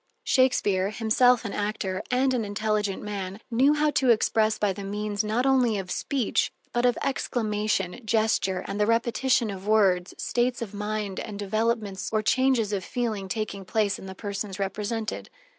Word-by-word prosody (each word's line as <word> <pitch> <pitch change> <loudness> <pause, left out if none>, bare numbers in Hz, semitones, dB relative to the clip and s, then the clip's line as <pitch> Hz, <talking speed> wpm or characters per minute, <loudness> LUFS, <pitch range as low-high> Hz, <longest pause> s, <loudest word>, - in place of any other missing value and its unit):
Shakespeare, 205 -7 +2
himself 230 +2 +3
an 200 - -4
actor, 205 -2 -2
and 260 +1 +2
an 240 -3 0
intelligent 210 -1 -1
man, 200 -1 -5
knew 270 +6 +4
how 300 0 +2
to 260 -3 +2
express 220 -1 +3
by 205 -2 +1
the 200 - -7
means 205 +1 -2
not 220 +4 0
only 255 -5 +3
of 185 -2 -5
speech, 270 -6 0 0.2
but 240 +1 +3
of 245 - +1
exclamation, 215 -6 -1
gesture, 215 -4 +1
and 200 +1 -4
the 210 - +3
repetition 235 0 +2
of 195 0 -8
words, 190 -4 +3
states 245 0 0
of 215 -3 -6
mind 210 -1 -3
and 205 - -6
developments 210 -1 -1
or 215 -1 +1
changes 255 -3 +2
of 195 -2 -1
feeling 220 -5 -2
taking 200 -2 -3
place 205 +1 0
in 190 - -9
the 190 - -8
persons 200 -1 -5
represented. 210 +3 -3
215 Hz, 165 wpm, -26 LUFS, 200-235 Hz, 0.2 s, knew